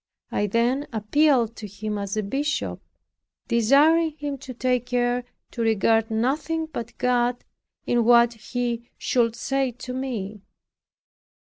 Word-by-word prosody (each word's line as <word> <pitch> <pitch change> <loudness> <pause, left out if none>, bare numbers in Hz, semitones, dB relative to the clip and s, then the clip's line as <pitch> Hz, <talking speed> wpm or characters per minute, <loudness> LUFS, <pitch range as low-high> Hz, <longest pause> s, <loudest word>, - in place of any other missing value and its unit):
I 205 - 0
then 240 +7 +1
appealed 235 +1 +2
to 215 - -7
him, 210 +1 -4
as 200 +1 -3
a 215 - 0
bishop, 280 +9 -2 0.7
desiring 290 +8 +4
him 285 -2 -4
to 265 0 -8
take 250 0 0
care 245 0 0 0.3
to 235 - -5
regard 225 0 +2
nothing 290 +8 0
but 240 -7 -7
God 245 0 +1 0.4
in 240 -1 +2
what 235 0 +5
he 235 +1 -4
should 235 -2 +1
say 270 +2 0
to 250 +1 -7
me. 220 -6 -4
245 Hz, 130 wpm, -24 LUFS, 225-270 Hz, 0.7 s, what